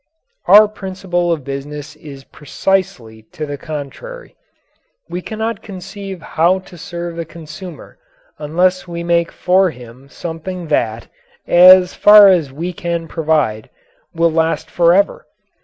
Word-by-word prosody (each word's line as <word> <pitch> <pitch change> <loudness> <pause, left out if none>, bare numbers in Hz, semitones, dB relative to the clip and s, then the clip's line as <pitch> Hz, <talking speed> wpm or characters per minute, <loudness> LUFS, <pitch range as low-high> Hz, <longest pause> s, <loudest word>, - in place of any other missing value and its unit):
Our 210 +1 +8
principle 185 -4 -3
of 160 -4 -2
business 145 +2 -7
is 140 -3 -12
precisely 140 -8 -3
to 155 - -5
the 145 -1 -5
contrary. 155 - -8 0.7
We 180 - -5
cannot 220 +3 -4
conceive 195 -1 -9
how 175 +4 +1
to 185 -1 -13
serve 175 -1 -7
the 170 - -3
consumer 165 +2 -11 0.4
unless 180 +5 0
we 170 0 -6
make 170 0 +1
for 185 +1 +2
him 125 0 -13
something 170 +2 -7
that, 115 0 -1 0.4
as 180 +1 +6
far 210 -1 +8
as 165 -7 +2
we 170 +6 -5
can 170 -1 -4
provide, 150 -10 -1 0.4
will 165 0 +1
last 160 0 -1
forever. 175 +3 +2
170 Hz, 125 wpm, -17 LUFS, 150-185 Hz, 0.7 s, Our